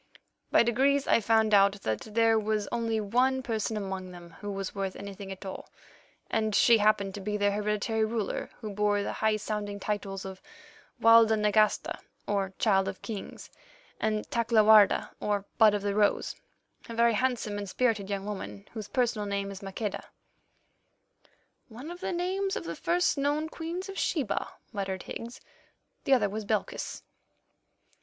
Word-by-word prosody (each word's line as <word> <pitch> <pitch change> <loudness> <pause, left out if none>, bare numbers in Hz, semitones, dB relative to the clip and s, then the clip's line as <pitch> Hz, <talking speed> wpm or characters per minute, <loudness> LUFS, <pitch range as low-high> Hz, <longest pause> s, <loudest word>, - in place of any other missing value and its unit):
By - - +5
degrees 270 +4 +2
I - - +5
found 220 0 +3
out 200 0 +5
that 110 -1 -1 0.2
there 225 -1 +4
was 215 -1 -1
only 230 -2 0
one 255 +5 +1
person 220 -3 -2
among 190 -2 -4
them 175 -1 -11
who 205 -1 -5
was 195 -1 -4
worth 195 -1 -3
anything 200 -1 -8
at 190 +1 -8
all, 190 - -7 0.6
and 215 -2 0
she 230 -2 +6
happened 205 -2 +2
to 200 - -6
be 210 +2 -2
their 205 0 +2
hereditary 210 +2 0
ruler 220 -2 -2
who 215 -2 -5
bore 205 0 +1
the - - -3
high 220 -1 +1
sounding 205 -1 -4
titles 195 -2 -3
of 190 -1 -8 0.6
Walda 230 -1 +6
Nagasta, 210 0 +2 0.3
or 195 -2 -1
Child 195 -3 +3
of 195 -1 -6
Kings, 215 -4 -7 0.5
and 215 -1 -1
Takla 230 -2 +3
Warda, 215 -1 +6
or 205 -1 -1
Bud 215 -2 +7
of 205 - -3
the 200 -1 0
Rose, 210 0 +1 0.5
a 230 - -5
very 235 0 +4
handsome 225 -3 -1
and 200 -1 -5
spirited 215 -3 0
young 200 -1 -3
woman, 205 0 -6
whose 215 -3 -6
personal 230 -3 0
name 200 0 -2
is 195 - -9
Maqueda——" 200 +2 -4 1.6
"One 255 +8 -9
of 350 - -8
the - - -3
names 380 +3 -1
of - - -3
the - - -5
first 350 -4 +1
known 295 +3 0
Queens 340 +4 -5
of 390 0 -6
Sheba," 280 - -1 0.3
muttered 190 -2 -3
Higgs; 235 +1 -7 0.6
"the 275 - +4
other 245 - +2
was 215 +2 -4
Belchis." - - -3
215 Hz, 165 wpm, -29 LUFS, 200-230 Hz, 1.6 s, Bud